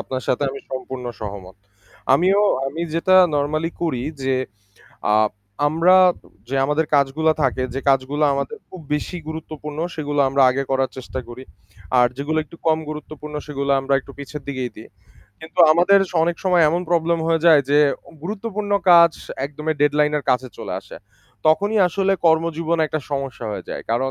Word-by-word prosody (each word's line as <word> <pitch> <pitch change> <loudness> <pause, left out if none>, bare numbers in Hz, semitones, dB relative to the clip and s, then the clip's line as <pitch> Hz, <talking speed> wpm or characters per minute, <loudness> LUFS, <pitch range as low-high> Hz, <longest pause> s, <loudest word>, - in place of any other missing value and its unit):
আপনার 130 -1 -5
সাথে 130 - 0
আমি 135 0 -8
সম্পূর্ণ 130 -1 -6 0.2
সহমত। 100 -3 -8 0.6
আমিও 190 +7 +3 0.2
আমি 150 +5 -5
যেটা 185 +3 +3 0.2
নরমালি 155 +3 -1
করি 140 -8 -1 0.2
যে 130 0 +1 0.8
আ - - +5 0.5
আমরা, 165 +4 +4 0.5
যে 135 - -4
আমাদের 150 +3 0
কাজগুলা 145 +3 +2
থাকে 130 -1 0
যে 135 - -2
কাজগুলো 135 +2 +1
আমাদের 140 +11 -3
খুব 185 - -11
বেশি 150 +4 -3
গুরুত্বপূর্ণ 155 -1 -7 0.2
সেগুলো 145 -2 -2
আমরা 135 +1 +2
আগে 135 +2 -1
করার 135 -1 +1
চেষ্টা 130 0 -6
করি। 120 +2 -9 0.6
আর 125 - +6
যেগুলো 150 +3 -2
একটু 170 - -15
কম 160 -1 +3
গুরুত্বপূর্ণ 150 0 -8
সেগুলো 140 -2 -3
আমরা 135 +1 0
একটু 140 - -14
পিছের 140 +1 -8
দিকেই 130 -3 -3
দিই। 110 - -12 0.5
কিন্তু 160 0 -12
আমাদের 180 +5 +5 0.2
অনেক 170 +1 0
সময় 180 -2 +4
এমন 170 +3 0
প্রবলেম 170 0 +2
হয়ে 165 -1 +1
যায় 160 -3 +7
যে 145 - +5 0.4
গুরুত্বপূর্ণ 205 +2 -4 0.2
কাজ 170 -1 +7 0.3
একদম 150 +2 -8
ডেডলাইন 150 +1 +3
এর 145 - -8
কাছে 130 +1 0
চলে - - -6
আসে। - - -12 0.5
তখনই 205 +7 +3
আসলে 195 +2 0
কর্মজীবন 165 0 +1
একটা 155 - -3
সমস্যা 135 -4 -4
হয়ে 105 - -6
যায়। - - -5
কারণ 130 +3 0
150 Hz, 160 wpm, -21 LUFS, 135-165 Hz, 0.8 s, যায়